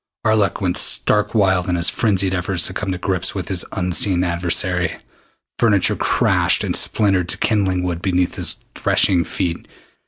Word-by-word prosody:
Arlok 110 -2 +1
went 90 -2 0
stark 105 +2 +3
wild 95 -4 +1
in 90 - 0
his 85 0 +1
frenzied 95 -4 +1
efforts 90 -1 -2
to 90 - -1
come 95 0 -4
to 90 - -3
grips 95 0 -3
with 95 -1 -5
his 95 -3 +1
unseen 90 0 +1
adversary. 90 0 -1 0.6
Furniture 110 -5 +2
crashed - - +1
and - - -2
splintered 95 -4 +1
to - - -5
kindling 95 -4 0
wood 85 -2 -3
beneath 90 -2 0
his - - -1 0.2
threshing 90 -3 +1
feet. 85 0 -4
90 Hz, 160 wpm, -19 LUFS, 90-100 Hz, 0.6 s, stark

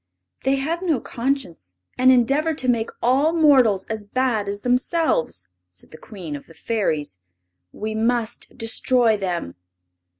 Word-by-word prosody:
"They 270 +1 +3
have 315 +6 -2
no 325 -8 +1
conscience, 230 - -4 0.2
and 255 +1 +5
endeavor 275 +6 +2
to 260 -3 -4
make 230 -2 +1
all 275 +6 +3
mortals 265 - +4
as 220 -1 -4
bad 225 -1 0
as 200 +1 -4
themselves," 250 - 0 0.2
said 90 0 -13
the 155 - -11
Queen 180 -8 -8
of 140 - -10
the 165 - -16
Fairies. 155 - -2 0.5
"We 215 +1 -5
must 230 +1 -1
destroy 230 0 +2
them." 180 - -3
230 Hz, 140 wpm, -22 LUFS, 200-265 Hz, 0.5 s, and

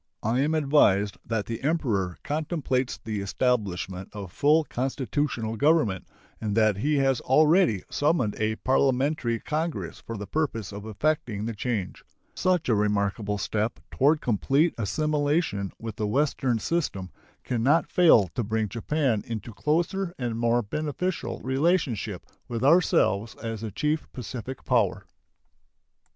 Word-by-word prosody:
I 115 +4 +1
am 150 +4 +1
advised 120 -10 +3
that 110 -3 -1
the 115 +1 -5
Emperor 120 - 0
contemplates 145 -4 -1
the 110 -3 -4
establishment 100 -4 -1
of 100 -4 -7
full 150 - +3
constitutional 130 -4 -2
government, 145 - +2 0.3
and 105 -1 -2
that 110 -3 +3
he 150 +8 +1
has 135 -2 +2
already 155 - +4
summoned 145 -8 +1
a 110 0 0
parliamentary 130 -1 +1
congress 150 - -3
for 115 - -6
the 100 - -5
purpose 115 -4 -2
of 100 +1 -8
effecting 110 -2 -1
the 115 - -3
change. 105 -3 -3 0.3
Such 180 -3 +1
a 120 - +3
remarkable 105 0 0
step 105 +2 -2
toward 150 +3 +3
complete 135 - +2
assimilation 145 - 0
with 115 -2 -7
the 105 -3 -1
Western 130 0 +1
system 105 - -2 0.3
can 120 -3 -2
not 145 +7 +4
fail 160 - +6
to 120 - -3
bring 110 0 -1
Japan 120 +1 0
into 115 -1 -5
closer 175 - -1
and 120 -3 -2
more 120 +1 +2
beneficial 155 - -3
relationship 130 - 0 0.2
with 115 0 -3
ourselves 115 - +3
as 115 -1 -5
the 110 - -4
chief 150 +9 -2
Pacific 125 +1 -7
power. 115 -7 +1
120 Hz, 135 wpm, -26 LUFS, 105-150 Hz, 0.3 s, fail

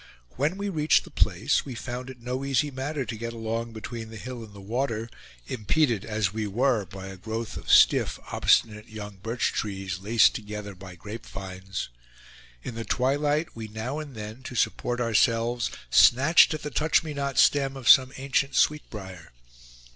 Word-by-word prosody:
When 150 +8 -1
we 200 0 -3
reached 155 -5 +3
the 175 - -14
place 110 +3 +1
we 130 -3 -7
found 125 +2 -6
it 130 -2 -10
no 125 +3 -4
easy 140 +1 +1
matter 135 +1 -3
to 115 - -5
get 115 +1 -5
along 115 +1 -3
between 110 +1 -7
the 110 - -9
hill 125 +1 -7
and 110 - -12
the 100 - -12
water, 115 +2 -2 0.4
impeded 120 -1 0
as 105 -3 -1
we 110 -1 -2
were 115 0 +1
by 95 -1 -9
a 95 0 -8
growth 110 +3 -5
of - - -8
stiff, - - +5
obstinate 105 -1 +2
young 105 -2 -8
birch 115 +5 -2
trees, 95 -3 -3
laced 110 +4 +4
together 105 -1 -6
by 95 -1 -11
grapevines. 95 - -7 0.7
In 125 - -5
the 115 0 -5
twilight, 145 +7 0
we 110 -1 -6
now 110 +7 -4
and 145 -4 -8
then, 110 +3 -7
to 130 -1 -8
support 120 +1 0
ourselves, 115 0 +2 0.2
snatched 140 +6 +6
at 155 - -8
the 150 - -4
touch 155 +2 +2
me 155 -2 -5
not 140 -1 -3
stem 135 -1 +4
of 130 -3 -7
some 130 +1 +7
ancient 140 +1 0
sweet 150 0 +2
brier. 95 -5 -9
115 Hz, 175 wpm, -26 LUFS, 105-135 Hz, 0.7 s, some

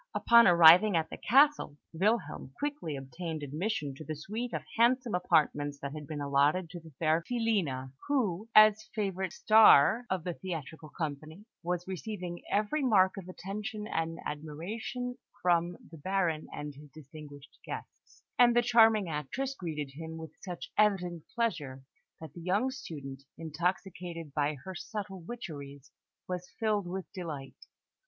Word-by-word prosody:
Upon 235 -1 +6
arriving 175 +3 +8
at 160 -1 -2
the - - -6
castle, 275 - +3 0.2
Wilhelm 190 - -1
quickly 285 - -3
obtained 155 +4 -6
admission 150 +1 -2
to 155 - -8
the 155 +1 -5
suite 220 +11 -5
of 155 -2 -3
handsome 240 +1 +3
apartments 145 -5 +1
that 140 0 -5
had 150 -2 -8
been 155 -2 -5
allotted 145 +5 +2
to 175 - -7
the 165 -1 -14
fair 160 0 +2
Filina, 190 - -1
who, 225 -7 0
as 215 -1 +8
the 215 0 -16
favourite 190 -4 -2
"Star" 220 +2 +6
of 185 -3 -1
the 175 - -3
theatrical 160 -3 -7
company, 155 +5 -6 0.2
was 175 0 -3
receiving 185 -2 -5
every 215 +9 0
mark 195 -8 +4
of 190 -3 -8
attention 210 +3 -5
and 165 -4 -2
admiration 200 - -5 0.2
from 175 -1 +1
the 165 - -11
Baron 175 -2 -1
and 150 0 -6
his 145 +1 -14
distinguished 145 0 -13
guests; - - -10 0.2
and 240 -1 +6
the 240 - +4
charming 225 -4 +5
actress 165 - -3
greeted 155 - -5
him 160 +3 -8
with 160 -1 -8
such 180 -3 -7
evident 180 -6 +1
pleasure 145 - -2 0.4
that 160 -3 -10
the 170 - -10
young 200 +9 +1
student, 140 - -8 0.2
intoxicated 170 0 -3
by 150 +1 0
her 190 - -5
subtle 195 0 -6
witcheries, 145 - -8 0.4
was 180 0 -5
filled 210 -4 0
with 190 +1 -4
delight. 150 -7 -7
175 Hz, 150 wpm, -30 LUFS, 155-210 Hz, 0.4 s, arriving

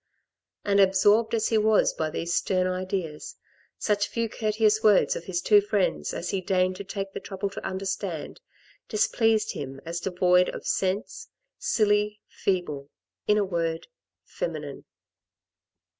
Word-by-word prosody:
And 200 0 +3
absorbed 205 +4 +4
as 220 - 0
he 225 - +3
was 215 0 +3
by 160 -1 -2
these 170 +2 -3
stern 185 +1 +1
ideas, 185 -4 -3 0.4
such 205 -1 0
few 230 -1 -2
courteous 215 0 +1
words 210 -3 +4
of 170 - -6
his 175 -2 -2
two 210 -1 +6
friends 190 - 0
as 175 - -4
he 195 - -1
deigned 185 -1 +1
to 200 - -6
take 195 0 -5
the - - -4
trouble 195 0 -4
to - - -8
understand, 190 -4 -4 0.5
displeased 225 0 +2
him 135 -1 -6
as 170 +1 -3
devoid 180 0 +3
of - - -7
sense, 190 +3 -2 0.3
silly, 210 -1 +1
feeble, 150 -7 -2 0.4
in 210 - +4
a 205 - +2
word 165 -3 -2 0.2
— - - -65
feminine. - - -5
195 Hz, 145 wpm, -26 LUFS, 180-210 Hz, 0.5 s, two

